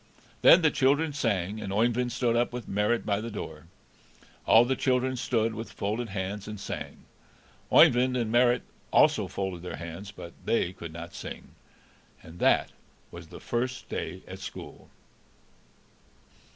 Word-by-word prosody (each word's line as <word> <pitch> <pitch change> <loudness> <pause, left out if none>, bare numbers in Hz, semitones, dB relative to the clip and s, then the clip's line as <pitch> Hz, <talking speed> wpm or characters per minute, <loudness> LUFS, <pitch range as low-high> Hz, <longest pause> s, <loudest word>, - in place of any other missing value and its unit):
Then 175 - +8
the 160 - +5
children 145 +4 +2
sang, 105 -6 -1
and 95 - -5
Oeyvind 120 +4 +1
stood 120 -1 +1
with 120 -1 -6
Marit 105 +4 0
by 100 0 0
the 115 - -5
door. 80 -7 -7 0.8
All 115 +2 +7
the 130 +2 0
children 130 0 +1
stood 115 -2 0
with 115 +1 -7
folded 110 +4 -3
hands 95 +1 -4
and 105 -1 -6
sang. - - -7 0.7
Oeyvind 125 +1 +6
and 115 -3 -1
Marit 120 +1 +3 0.3
also - - +4
folded 95 -3 -4
their 90 - -6
hands, 85 +6 -8
but 85 -4 -10
they 95 -6 0
could 85 -3 -8
not 85 +1 -9
sing. - - -8 0.7
And 80 +2 -12
that - - +3 0.4
was - - -10
the - - -11
first 125 +2 -3
day - - -5
at - - -8
school. - - -9
115 Hz, 150 wpm, -28 LUFS, 95-125 Hz, 0.8 s, Then